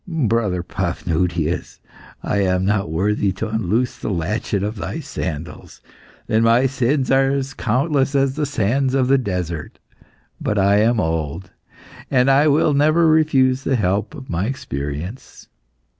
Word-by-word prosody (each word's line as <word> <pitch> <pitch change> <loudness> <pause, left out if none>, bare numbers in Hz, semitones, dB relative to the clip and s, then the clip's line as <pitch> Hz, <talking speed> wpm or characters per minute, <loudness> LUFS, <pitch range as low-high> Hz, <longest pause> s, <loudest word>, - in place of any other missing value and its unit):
"Brother 115 - 0
Paphnutius, 85 -2 -2 0.4
I 100 - 0
am 95 -1 +1
not 100 -3 0
worthy 100 +4 0
to 105 +4 -4
unloose 110 +3 -1
the - - -4
latchet 95 +2 -2
of 105 +2 -3
thy 85 -4 -4
sandals, 80 +2 -6 0.5
and 110 +1 +2
my 115 +3 +4
sins 135 +1 0
are 135 0 +4
as 135 -1 -2
countless 135 +4 0
as 135 -1 +2
the 150 0 -2
sands 130 +2 0
of 130 -1 +1
the 135 0 +4
desert. 90 - -4 0.6
But 105 - -1
I 100 +1 +4
am 115 +2 +3
old, 80 +1 -3 0.6
and 130 0 +3
I 140 +3 +4
will 150 +1 +3
never 155 +4 +3
refuse 140 -5 +3
the 135 - +1
help 100 +4 -1
of 135 -3 -10
my 90 +4 -2
experience." 80 - -6
110 Hz, 145 wpm, -20 LUFS, 90-135 Hz, 0.6 s, my